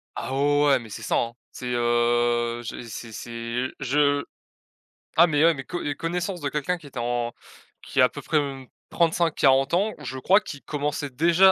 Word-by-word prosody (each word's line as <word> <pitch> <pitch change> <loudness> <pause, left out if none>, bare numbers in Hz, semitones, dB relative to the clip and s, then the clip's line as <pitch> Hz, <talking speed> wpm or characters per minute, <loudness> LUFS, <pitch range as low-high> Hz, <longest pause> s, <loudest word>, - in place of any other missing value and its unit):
Ah 130 - -4
ouais 145 +1 +3
ouais, 140 -2 +4
mais 115 -2 -11
c'est 110 - -7
ça 110 - -1
hein. 115 0 0 0.2
C'est, 125 - -8
heu, 120 0 +1
je 115 - -6
c'est 115 +1 -7
c'est 115 +3 -4
je 145 +1 +2 0.9
ah 170 +2 +8
mais 150 -2 +2
ouais, 165 +1 +6
mais 135 -3 -6
co 175 - -4
et 145 - -2
connaissance 175 +3 -3
de 145 - -2
quelqu'un 150 +5 -1
qui 155 -4 -14
était 135 -3 -7
en 120 0 -1 0.5
qui - - -3
à 130 - +8
à - - +1
peu - - -8
près, 155 - +1
mmh, 135 -2 -4 0.2
35-40 160 -5 +3
ans 200 +5 +2
ou - - -11
je 130 - -5
crois, 190 +9 +5
qu'il 145 -9 -9
commençait 145 0 -2
déjà 170 +8 +5
140 Hz, 205 wpm, -25 LUFS, 120-160 Hz, 0.9 s, ah